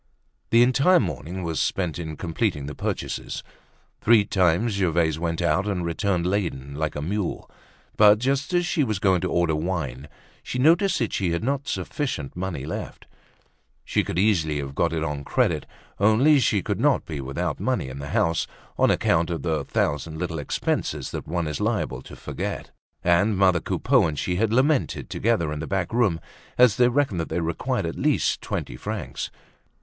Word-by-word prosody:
The 115 +1 +6
entire 140 +9 +4
morning 90 - -4
was 80 -2 -2
spent 90 -3 -1
in 80 -3 -5
completing 80 -4 -1
the 75 - -5
purchases. - - -4 0.6
Three 110 -2 +5
times 95 +4 +2
Gervaise 85 -5 +1
went 85 0 -2
out 85 +4 +1
and 90 -4 -1
returned 85 +1 0
laden 85 -8 -2
like 75 +1 -2
a 75 - -3
mule. 100 +3 -3 0.5
But 105 0 +7
just 135 - -1
as 175 -1 +2
she 170 -3 +1
was 110 -5 -1
going 95 -3 +2
to 90 - -1
order 85 -2 +2
wine 75 -5 -3 0.3
she - - -5
noticed 165 +9 +4
that 115 - -1
she 90 -4 0
had 85 - -2
not 140 +2 -1
sufficient 130 - -3
money 90 -6 -4
left. 80 - -6 0.8
She - - +1
could - - -4
easily 85 -7 +2
have 70 -1 -4
got 85 +3 +1
it 80 -1 -1
on 75 -2 -3
credit; - - 0 0.3
only 120 +9 +5
she 105 -6 +2
could - - -2
not - - +2
be 75 -3 -5
without 70 +1 -3
money - - -1
in 65 +1 -7
the 70 - -6
house, 85 +2 +1 0.3
on - - +5
account 85 +1 +2
of 80 -5 -3
the 80 -4 0
thousand 80 +3 -1
little 85 -1 -3
expenses 70 - -2
that - - -6
one 85 +1 -1
is 75 -2 -3
liable 65 -1 -1
to - - -11
forget. - - -5 0.3
And 95 +4 +3
mother 95 -2 +4
Coupeau 100 - +2
and 75 -2 -4
she 90 +5 -1
had 110 +1 +1
lamented 135 +4 +1
together 90 -10 +1
in 75 - -5
the 80 - -5
back 95 +1 -2
room 105 -9 +2 0.4
as 120 -3 +5
they 125 -1 +5
reckoned 125 -7 +1
that 80 - -3
they - - -1
required 85 0 -1
at - - -4
least - - +1
twenty - - -4
francs. - - -4
90 Hz, 185 wpm, -24 LUFS, 80-110 Hz, 0.8 s, But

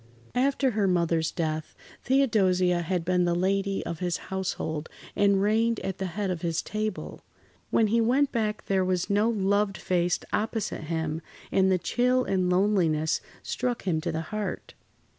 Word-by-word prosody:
After 265 +1 +2
her 210 -3 +1
mother's 170 -3 +1
death, 155 -2 -3 0.3
Theodosia 190 -9 +3
had 175 0 -2
been 180 0 +2
the 175 0 +1
lady 195 +2 0
of 170 - -4
his 180 -1 -1 0.2
household 160 -5 -3 0.3
and 200 -1 +3
reigned 225 +2 +2
at 190 - -4
the 190 - -1
head 200 -3 0
of 175 -3 -4
his 165 -2 -1
table. 215 0 -4 0.5
When 225 - +3
he 230 +2 +2
went 265 +5 +2
back 215 -3 -1
there 190 -1 +2
was 185 0 0
no 210 +3 +3
loved 200 -2 +1
face 175 -1 +1
opposite 215 -6 -2
him, 160 0 -2 0.3
and 190 0 +3
the 185 - +4
chill 250 +8 +1
and 185 -4 0
loneliness 180 -5 +2 0.2
struck 245 -1 -2
him 165 -5 0
to 170 +1 -2
the 160 0 -2
heart. 215 -1 -4
190 Hz, 160 wpm, -27 LUFS, 175-215 Hz, 0.5 s, the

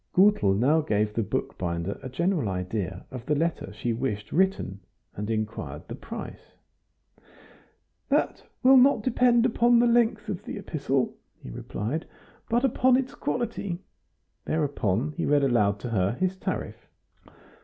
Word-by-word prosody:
Gutel 185 - +5
now 140 +9 +3
gave 105 -7 0
the 115 - 0
bookbinder 85 -2 -3
a 130 - -6
general 165 - 0
idea 95 0 -3
of 125 -2 -7
the 150 - +2
letter 165 - -1
she 115 +3 -2
wished 110 -4 -3
written, 185 - +1 0.3
and 105 +2 -5
inquired 105 -10 -4
the - - -6
price. - - -9 1.5
"That - - +1 0.2
will 265 +1 +8
not 255 -4 +5
depend 245 -1 +3
upon 240 0 +4
the 240 - +5
length 235 -2 +2
of 200 -4 -4
the - - -6
epistle," 135 -4 -1 0.3
he - - -8
replied, 110 - -4 0.4
"but 240 +3 +2
upon 255 0 +4
its 260 -1 -2
quality." 225 -7 -3 0.7
Thereupon 140 - 0
he - - -1
read 145 -1 +3
aloud 105 -6 +3
to 125 - -4
her 95 -2 +1
his 185 +8 -1
tariff. 190 - -5
140 Hz, 145 wpm, -27 LUFS, -, 1.5 s, will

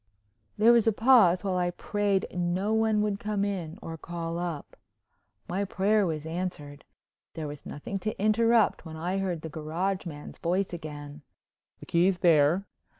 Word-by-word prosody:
There 225 +3 +6
was 235 -2 +4
a - - +6
pause 215 -6 +5
while 190 -2 0
I 180 0 +1
prayed 200 +2 0
no 180 +4 0
one 220 -1 +2
would 205 -1 -1
come 205 -1 -1
in 180 -4 -4
or 165 -1 -7
call 170 0 -4
up. 170 -4 -5 0.7
My 190 +3 -1
prayer 200 +1 +2
was 155 -2 -3
answered. 160 -4 -5 0.5
There 155 -2 -4
was 145 -1 -9
nothing 195 +7 -5
to 215 +3 -4
interrupt 225 +1 +3
when 160 -2 -8
I 180 +4 -2
heard 180 -4 -2
the 160 - -6
garage 170 +5 -2
man's 145 -3 -9
voice 180 +2 0
again: 150 -2 -8 0.6
"The - - -9
key's 180 +2 +2
there." 165 +2 +4
180 Hz, 160 wpm, -28 LUFS, 165-200 Hz, 0.7 s, There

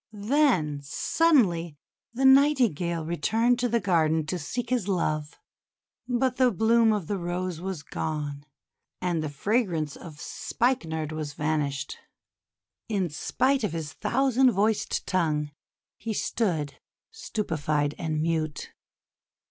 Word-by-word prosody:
Then 180 - +3
suddenly 175 - +2 0.3
the 260 +3 -1
Nightingale 240 - +4
returned 225 +8 +1
to 245 0 +1
the 235 +1 +2
garden 160 -5 +2
to 180 +3 -3
seek 230 +11 -4
his 240 -6 0
love. 155 -5 -1 0.7
But 250 +1 0
the 255 -1 +5
bloom 225 +2 +3
of 210 -5 -1
the 200 +3 -2
Rose 175 -1 -3
was 185 -5 -4
gone, 145 -1 -4 0.5
and 175 -3 -1
the 155 - -3
fragrance 165 - -1
of 155 -4 -11
Spike 245 - -1
nard 160 -1 -3
was 155 -2 -4
vanished. 145 -2 -2 0.9
In 190 -6 0
spite 260 - 0
of 205 - -1
his 155 -3 -4
thousand 265 - +2
voiced 215 0 0
tongue, 155 -5 0 0.5
he 220 0 -4
stood 160 -13 -1 0.3
stupefied 155 - -2
and 155 -2 -1
mute. 160 -2 -2
175 Hz, 125 wpm, -27 LUFS, 155-235 Hz, 0.9 s, the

